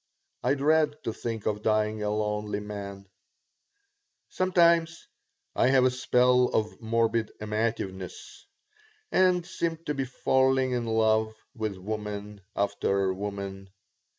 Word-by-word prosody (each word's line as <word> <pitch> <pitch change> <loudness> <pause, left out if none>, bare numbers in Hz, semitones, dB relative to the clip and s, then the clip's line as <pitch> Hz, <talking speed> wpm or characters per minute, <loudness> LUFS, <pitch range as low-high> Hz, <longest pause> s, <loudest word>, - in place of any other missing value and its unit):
I 140 - +2
dread 150 +1 +3
to 115 - -2
think 115 -2 -5
of 105 -1 -1
dying 110 0 +1
a 105 - -1
lonely 105 -1 -1
man 100 -1 -7 1.2
Sometimes 170 -3 +2 0.5
I - - +3
have 130 -1 +5
a 130 - +4
spell 125 0 +3
of 110 0 -2
morbid 115 -1 +1
amativeness 105 -4 -4 0.6
and 180 -2 +3
seem 170 -2 -2
to 150 - -1
be 135 -2 -2
falling 130 0 +2
in 120 -2 -1
love 110 -1 +2 0.2
with 110 -5 -3
woman 105 +1 -5
after 100 -1 0
woman. 100 0 -6
110 Hz, 120 wpm, -28 LUFS, 105-130 Hz, 1.2 s, have